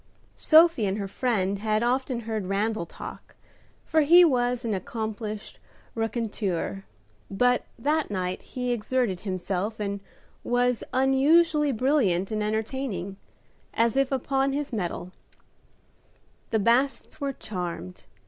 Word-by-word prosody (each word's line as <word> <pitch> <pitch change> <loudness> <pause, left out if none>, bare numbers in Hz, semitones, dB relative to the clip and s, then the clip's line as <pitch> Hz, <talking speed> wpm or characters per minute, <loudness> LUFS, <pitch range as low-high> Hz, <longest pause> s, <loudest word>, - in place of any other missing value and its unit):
Sophie 320 -8 +5
and 195 +1 -1
her 200 -2 -3
friend 200 -3 -1
had 215 +1 0
often 250 0 0
heard 220 -4 -3
Randal 200 -2 -1
talk, - - -10 0.5
for 315 - +3
he 345 +4 +8
was 245 -4 +1
an 225 - 0
accomplished 215 +1 -5 0.3
raconteur, 210 - -2 0.4
but 245 +5 +2
that 300 +5 0
night 185 -2 -2
he 250 -1 -4
exerted 240 -4 0
himself, 195 +2 -3
and 200 -1 -2 0.4
was 245 0 +1
unusually 290 +4 +4
brilliant 225 - +1
and 215 -1 -1
entertaining, 215 -3 -3 0.6
as 230 +2 +2
if 275 0 +2
upon 270 +1 0
his 285 -2 -3
mettle. 180 -3 -3 1.4
The 220 - +1
Bassets 255 +7 +1
were 280 -1 -1
charmed. 175 - -6
225 Hz, 120 wpm, -26 LUFS, 200-265 Hz, 1.4 s, he